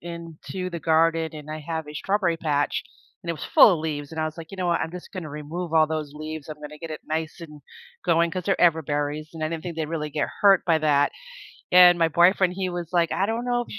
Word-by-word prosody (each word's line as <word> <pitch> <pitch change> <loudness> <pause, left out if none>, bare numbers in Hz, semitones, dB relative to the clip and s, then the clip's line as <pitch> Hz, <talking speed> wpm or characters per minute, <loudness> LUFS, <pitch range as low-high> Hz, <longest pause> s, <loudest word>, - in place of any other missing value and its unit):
into 170 +2 -7
the 170 -1 -5
garden 160 0 +2
and 150 0 -9
I 155 0 -5
have 160 -2 -3
a 150 - -9
strawberry 180 0 0
patch 145 -3 0 0.4
and 170 - -10
it 170 - 0
was 150 - -7
full 195 - +7
of - - -4
leaves 150 -2 -4
and 160 - -8
I 155 - +1
was 155 +1 -5
like, 165 -1 -9
"You 195 - -8
know 180 -1 -1
what 170 - +1
I'm 160 - -2
just 180 0 -10
gonna 175 -5 -6
remove 155 +3 -5
all 155 -1 +5
those 155 -2 -4
leaves. 155 0 -7
I'm 155 - -6
going 150 0 -9
to 150 - -11
get 165 -1 -8
it 155 - -6
nice 160 +2 -3
and 150 -3 -10 0.5
going." 170 0 +3
'Cause 185 0 -4
they're 195 - 0
ever 165 -2 +5
berries 145 +1 -2
and 155 -1 -3
I - - -1
didn't 165 -1 -5
think 170 -2 -6
they 160 - -1
really 150 -1 -4
get 150 - -1
hurt 200 -2 +5
by 165 -2 +3
that. 145 -2 +2 0.6
And 180 -1 +8
my 165 - +3
boyfriend 180 +3 +4
he 190 -1 -2
was 175 -2 -5
like 170 -2 +2
"I 195 - +1
don't 230 +3 -2
know 245 0 +1
if - - -12
you - - -7
160 Hz, 270 wpm, -24 LUFS, 155-175 Hz, 0.6 s, And